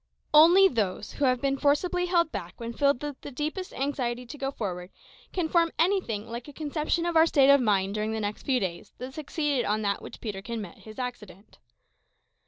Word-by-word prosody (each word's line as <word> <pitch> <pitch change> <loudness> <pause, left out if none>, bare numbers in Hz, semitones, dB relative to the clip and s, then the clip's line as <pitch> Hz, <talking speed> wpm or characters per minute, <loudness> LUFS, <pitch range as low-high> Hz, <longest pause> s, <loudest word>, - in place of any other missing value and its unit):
Only 345 +6 +8
those 210 - -2
who 285 - -1
have 255 -1 +3
been 275 -1 0
forcibly 355 +5 +1
held 340 -2 +2
back 175 -2 -7
when 235 0 -5
filled 280 +1 +2
with 290 -2 -5
the - - -7
deepest 305 +7 -4
anxiety 250 -3 -2
to 245 - -9
go 270 - -1
forward, 180 -8 -5 0.4
can 355 -3 -1
form 335 0 +2
any 375 +4 +3
thing 215 - -5
like 235 +2 -7
a 290 - -10
conception 310 +3 -1
of 345 -1 -1
our 320 0 +6
state 280 -3 +5
of 280 -1 +6
mind 200 -4 +1
during 215 +1 -1
the 215 -2 -2
few 260 -2 0
days 180 -5 -5
that 255 +1 -7
succeeded 295 -3 -1
that - - -3
on 210 -1 +1
which - - -10
Peterkin 215 +1 -5
met 200 -5 -8
with - - -19
his 215 -1 -11
accident. 225 -6 -7
265 Hz, 205 wpm, -27 LUFS, 215-305 Hz, 0.4 s, Only